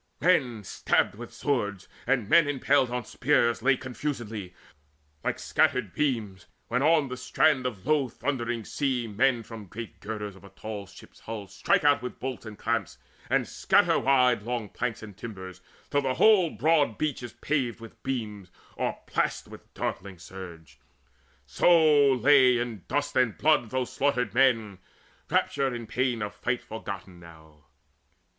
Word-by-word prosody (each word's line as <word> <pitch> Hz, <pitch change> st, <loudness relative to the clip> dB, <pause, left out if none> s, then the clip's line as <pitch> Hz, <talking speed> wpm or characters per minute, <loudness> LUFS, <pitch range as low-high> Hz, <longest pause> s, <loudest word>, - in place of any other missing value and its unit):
Men 130 Hz, -, +2 dB
stabbed -, -, +1 dB
with 115 Hz, +3 st, -9 dB
swords, 105 Hz, -9 st, -2 dB, 0.2 s
and 125 Hz, -5 st, +1 dB
men 165 Hz, +4 st, +5 dB
impaled 135 Hz, -2 st, +2 dB
on 125 Hz, -1 st, -3 dB
spears 120 Hz, -4 st, +1 dB
Lay 135 Hz, +3 st, +4 dB
all -, -, -3 dB
confusedly, 120 Hz, -8 st, -5 dB, 0.7 s
like -, -, -1 dB
scattered 130 Hz, -10 st, +1 dB
beams, 110 Hz, -9 st, -2 dB, 0.2 s
When 125 Hz, +2 st, +1 dB
on 155 Hz, -1 st, +4 dB
the 125 Hz, -, -5 dB
strand 130 Hz, +1 st, +2 dB
of 105 Hz, -7 st, -7 dB
the 150 Hz, -, -1 dB
low 145 Hz, -4 st, +2 dB
thundering 120 Hz, -3 st, -3 dB
sea 130 Hz, -4 st, -1 dB
Men 115 Hz, +3 st, +1 dB
from 110 Hz, -3 st, -10 dB
great 115 Hz, +5 st, -9 dB
girders 105 Hz, -3 st, -6 dB
of 95 Hz, -, -17 dB
a 100 Hz, -, -12 dB
tall 105 Hz, -2 st, -7 dB
ship's 95 Hz, -, -16 dB
hull 110 Hz, -2 st, -6 dB
Strike 100 Hz, +8 st, +1 dB
out 145 Hz, -4 st, +4 dB
the 125 Hz, -, -3 dB
bolts 130 Hz, -3 st, -6 dB
and 105 Hz, -1 st, -9 dB
clamps, 115 Hz, -5 st, -2 dB, 0.3 s
and -, -, +1 dB
scatter -, -, +3 dB
wide 125 Hz, -4 st, +3 dB
Long 115 Hz, -1 st, -4 dB
planks 120 Hz, 0 st, -4 dB
and 105 Hz, -3 st, -10 dB
timbers, 95 Hz, -5 st, -9 dB, 0.3 s
till 145 Hz, -, +2 dB
the 130 Hz, -2 st, -1 dB
whole 200 Hz, -6 st, +5 dB
broad 150 Hz, -9 st, +2 dB
beach 150 Hz, -4 st, -2 dB
Is 120 Hz, -2 st, -8 dB
paved 130 Hz, -6 st, -2 dB
with 115 Hz, -1 st, -13 dB
beams 105 Hz, -7 st, -4 dB, 0.3 s
o'erplashed -, -, -2 dB
by -, -, -8 dB, 0.2 s
darkling 95 Hz, 0 st, -4 dB
surge; 85 Hz, -3 st, -11 dB, 0.7 s
So 155 Hz, -5 st, +5 dB
lay 130 Hz, -1 st, +5 dB
in 120 Hz, -6 st, -4 dB
dust 145 Hz, 0 st, -1 dB
and 125 Hz, -4 st, +2 dB
blood 150 Hz, -7 st, +3 dB
those 130 Hz, 0 st, -2 dB
slaughtered 125 Hz, -6 st, 0 dB
men, 115 Hz, -7 st, +2 dB, 0.5 s
Rapture 140 Hz, -1 st, +1 dB
and 120 Hz, -3 st, -5 dB
pain 125 Hz, -3 st, -1 dB
of 105 Hz, -, -5 dB
fight 120 Hz, 0 st, -2 dB
forgotten 100 Hz, -4 st, -7 dB
now. 80 Hz, -3 st, -16 dB
120 Hz, 160 wpm, -27 LUFS, 105-135 Hz, 0.7 s, men